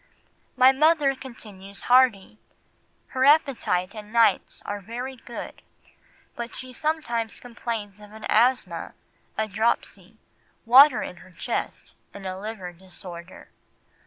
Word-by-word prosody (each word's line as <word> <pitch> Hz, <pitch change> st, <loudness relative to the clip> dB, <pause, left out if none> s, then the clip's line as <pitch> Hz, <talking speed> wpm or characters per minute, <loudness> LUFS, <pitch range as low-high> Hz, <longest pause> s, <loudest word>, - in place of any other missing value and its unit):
"My 255 Hz, +1 st, +8 dB
mother 300 Hz, 0 st, +3 dB
continues 210 Hz, -7 st, -10 dB
hearty; 240 Hz, -5 st, +3 dB, 0.7 s
her 260 Hz, -, -1 dB
appetite 265 Hz, -, +3 dB
and 210 Hz, -1 st, -10 dB
nights 225 Hz, -4 st, +2 dB
are 205 Hz, 0 st, -4 dB
very 245 Hz, +6 st, -6 dB
good, 240 Hz, -1 st, -9 dB, 0.7 s
but 235 Hz, 0 st, -6 dB
she 255 Hz, -1 st, -8 dB
sometimes 240 Hz, -7 st, -2 dB
complains 225 Hz, -4 st, -6 dB
of 210 Hz, 0 st, -13 dB
an 220 Hz, 0 st, -9 dB
asthma, 245 Hz, +4 st, +1 dB, 0.4 s
a 220 Hz, -, 0 dB
dropsy, 220 Hz, +3 st, -2 dB, 0.5 s
water 260 Hz, +3 st, +7 dB
in 180 Hz, -, -7 dB
her 185 Hz, -, -15 dB
chest, 175 Hz, -, -5 dB, 0.2 s
and 200 Hz, -1 st, -9 dB
a 185 Hz, 0 st, -3 dB
liver 195 Hz, -4 st, -6 dB
disorder." 175 Hz, -1 st, -11 dB
225 Hz, 120 wpm, -25 LUFS, 200-255 Hz, 0.7 s, My